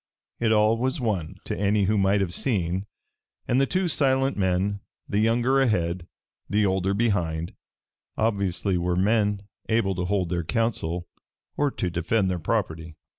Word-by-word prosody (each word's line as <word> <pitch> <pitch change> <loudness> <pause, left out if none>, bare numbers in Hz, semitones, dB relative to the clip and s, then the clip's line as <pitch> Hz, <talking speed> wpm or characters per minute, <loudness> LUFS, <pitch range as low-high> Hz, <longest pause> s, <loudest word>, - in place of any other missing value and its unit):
It 115 -2 +2
all 110 +1 +4
was 130 +5 -1
one 100 -10 -2
to - - -2
any 100 +1 +2
who 105 +3 +2
might 100 0 +3
have 90 -3 -1
seen, 95 -5 -1 0.6
and 125 +3 +3
the 135 - +2
two 185 +3 0
silent 135 -3 +2
men, 95 +1 0 0.3
the 100 - 0
younger 120 +5 +3
ahead, 90 -7 0 0.4
the 105 0 +2
older 95 0 +1
behind, 85 -7 0 0.6
obviously 100 -4 0
were 90 0 0
men 105 +1 +2 0.3
able 110 -4 +2
to 90 -1 -2
hold 95 -2 0
their 85 0 -1
counsel 90 -5 -1 0.5
or 145 - +2
to 90 -9 -3
defend 95 +4 +1
their 90 - -2
property. 80 -4 -2
100 Hz, 155 wpm, -25 LUFS, 90-115 Hz, 0.6 s, all